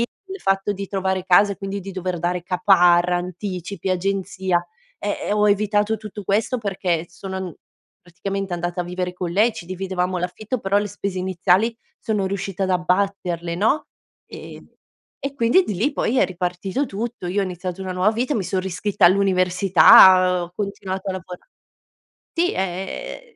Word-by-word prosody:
il 385 +11 -6
fatto 195 - +1
di 200 0 -6
trovare 190 -1 -2
casa, 200 +2 +5
e - - -9
quindi 195 +1 -5
di 195 +1 -8
dover 185 -1 -3
dare 175 +1 -1
caparra, 180 -1 +4
anticipi, 180 +1 -5
agenzia, 190 -1 -1 0.3
ehm, 205 0 -2
e - - +1
ho 210 0 +3
evitato 210 +1 +1
tutto 210 0 -8
questo 215 +6 0
perché 185 -6 -1
s 170 - -21
sono 190 -1 -5
n 180 -4 -6 0.5
praticamente 195 +2 -5
andata 175 +1 -2
a - - -2
vivere 180 0 -3
con 180 -1 -4
lei, 215 +7 +3
ci 175 - -9
dividevamo 185 0 -2
l'affitto 205 +7 -4
però 195 -1 0
le 205 0 -2
spese 200 -1 -4
iniziali 185 +5 +1 0.2
sono 210 -3 -1
riuscita 195 0 -3
ad 190 - -1
abbatterle, 180 -2 0
no? 220 - +1 0.4
Ehm, - - -11 0.6
e 275 0 -3
quindi 235 +11 +4
di 210 - -4
lì 235 +11 0
poi 260 -2 0
è - - +5
ripartito 185 +7 -2
tutto. 225 -4 -5
Io 185 +3 -2
ho - - +1
iniziato 180 0 -5
una 190 -1 -4
nuova 185 +3 +2
vita. 245 +6 -1
Mi 215 - 0
son 190 +1 -2
riscritta 190 +1 -1
all'università, 185 -1 +6
ho 175 0 -8
continuato 195 -1 -4
a - - -1
lavora 180 -1 -9 0.9
sì 345 +2 +1
è - - -3
ehm, 195 - -5
190 Hz, 170 wpm, -22 LUFS, 180-205 Hz, 0.9 s, all'università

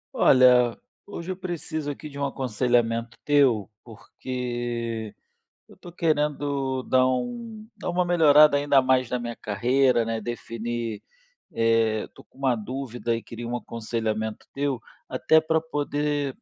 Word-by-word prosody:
Olha, 125 -3 +5 0.3
hoje 190 -3 -6
eu - - -3
preciso 165 -4 -4
aqui 150 +2 -6
de 140 -1 -9
um 140 - 0
aconselhamento 120 -3 0
teu, 135 -9 +3 0.2
porque 120 -1 -5 0.6
eu - - -17
tô 175 - -12
querendo 145 -5 -1
dar 130 0 +3
um 225 - -4
dar - - -5
uma 180 +1 +1
melhorada 155 -4 +6
ainda 145 -1 +4
mais 130 -1 +2
na 125 - 0
minha 120 -1 -5
carreira, 125 +3 +2
né, 115 0 -2
definir, 115 0 -4 0.5
eh, 115 -1 +1
tô - - -15
com - - -27
uma 135 -2 +1
dúvida 120 0 -3
e 115 - -6
queria 115 0 -7
um 120 +1 -2
aconselhamento 110 -2 -4
teu. 140 -2 -1 0.3
Até 160 0 +3
pra 160 0 +1
poder 145 -3 -2
130 Hz, 140 wpm, -25 LUFS, 115-145 Hz, 0.6 s, melhorada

